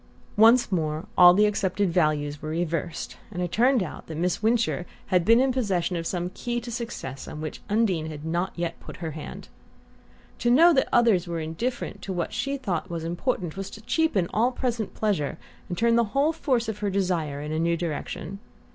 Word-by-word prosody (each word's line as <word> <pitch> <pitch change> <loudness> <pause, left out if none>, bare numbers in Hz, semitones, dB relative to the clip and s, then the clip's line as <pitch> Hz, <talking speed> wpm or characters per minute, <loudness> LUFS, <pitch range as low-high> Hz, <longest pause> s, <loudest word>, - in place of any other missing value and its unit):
Once 230 +2 +6
more 155 -1 -1
all 180 -1 +9
the 210 +2 +5
accepted 205 -2 0
values 150 -4 +1
were 155 - -5
reversed, 165 0 -3
and 180 - -6
it 175 - -3
turned 245 +3 +3
out 155 - -8
that 160 - -6
Miss 180 +1 0
Wincher 220 -5 +1 0.3
had 180 -2 +4
been 230 +6 +6
in 265 +1 +3
possession 190 -8 0
of 165 -1 -2
some 180 0 -2
key 240 +4 -3
to 240 0 -8
success 220 - -5
on 150 - -7
which 155 0 -6
Undine 200 -7 +1
had 155 -1 -7
not 170 +3 -1
yet 170 -1 -3
put - - -10
her 165 -2 -4
hand. 155 0 -8 0.9
To 240 - +1
know 330 +8 +7
that 265 - +2
others 220 -7 +4
were 170 -1 -3
indifferent 200 +6 -4
to 190 - -4
what 175 -2 -3
she 275 - -1
had 275 -1 -5
thought 180 -8 -2
important 170 - -2
was 195 0 -5
to 220 - -11
cheapen 240 - +1
all 235 +4 +3
present 240 -4 -3
pleasure 200 -10 -1 0.3
and 175 - -3
turn 230 0 +3
the 235 - +4
whole 300 +4 +3
force 255 -7 0
of 215 -2 -4
her 205 - -1
desires 170 -7 -1
in 150 - -5
a 155 - -1
new 170 +1 +1
direction. 175 +4 -4
185 Hz, 200 wpm, -26 LUFS, 165-230 Hz, 0.9 s, all